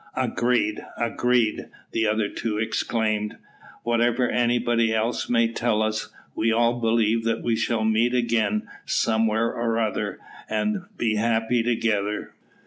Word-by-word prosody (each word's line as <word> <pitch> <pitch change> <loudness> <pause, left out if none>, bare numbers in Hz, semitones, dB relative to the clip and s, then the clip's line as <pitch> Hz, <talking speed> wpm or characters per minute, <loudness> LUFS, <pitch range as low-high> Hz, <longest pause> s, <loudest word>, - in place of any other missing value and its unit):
"Agreed! 120 -3 0
agreed!" 120 -1 +1 0.2
the 110 -1 +1
other 105 0 +1
two 105 0 -3
exclaimed. 110 -1 -1 0.5
"Whatever 120 +1 +2
anybody 120 -1 +2
else 110 +2 -1
may 115 -1 +3
tell 115 -1 0
us, 110 0 -2 0.2
we'll 115 0 +1
all 120 +1 +2
believe 115 0 +2
that 115 0 -1
we 115 -1 +1
shall 110 0 0
meet 110 +3 +2
again 115 -3 +1 0.2
somewhere 110 0 +1
or 115 -1 -1
other, 110 -3 -1 0.3
and 185 - -1
be 110 -2 0
happy 115 +2 +1
together." 110 -3 -1
115 Hz, 130 wpm, -24 LUFS, 110-120 Hz, 0.5 s, may